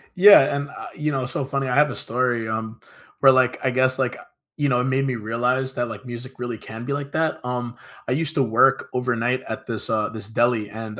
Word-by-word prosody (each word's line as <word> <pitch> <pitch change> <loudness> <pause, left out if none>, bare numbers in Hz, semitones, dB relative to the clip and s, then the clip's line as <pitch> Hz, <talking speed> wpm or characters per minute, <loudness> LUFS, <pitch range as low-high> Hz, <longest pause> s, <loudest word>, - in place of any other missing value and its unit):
Yeah, 185 -8 +7
and, 140 0 -3
uh, - - -9
you 150 0 -1
know, 135 -2 -1
so 130 +2 -3
funny, 135 0 -2
I 125 - 0
have 150 +1 +4
a - - -6
story, 120 -1 -1
um, 110 +1 -4 0.4
where, 135 - +7
like, 130 -1 +3
I 130 - +2
guess, 130 +1 +2
like, 130 -2 -1
uh, - - -13 0.3
you 145 -1 +1
know, 125 -2 +2
it - - -1
made 135 +1 +1
me 130 -2 -1
realize 125 +4 -1
that, 120 0 -1
like, 110 -1 -8
music 120 +1 -7
really 120 -2 -4
can 110 +2 -9
be 140 - -2
like 140 0 -4
that. 160 -4 -1
Um, 125 -1 -4 0.3
I - - -2
used 155 +3 -1
to 140 - +3
work 125 +3 +3
overnight 125 0 0
at 110 - -6
this, 115 -3 -4
uh, 110 -1 0
this 110 -2 -8
deli, 115 -2 +1
and 110 0 -7
125 Hz, 240 wpm, -23 LUFS, 115-135 Hz, 0.4 s, Yeah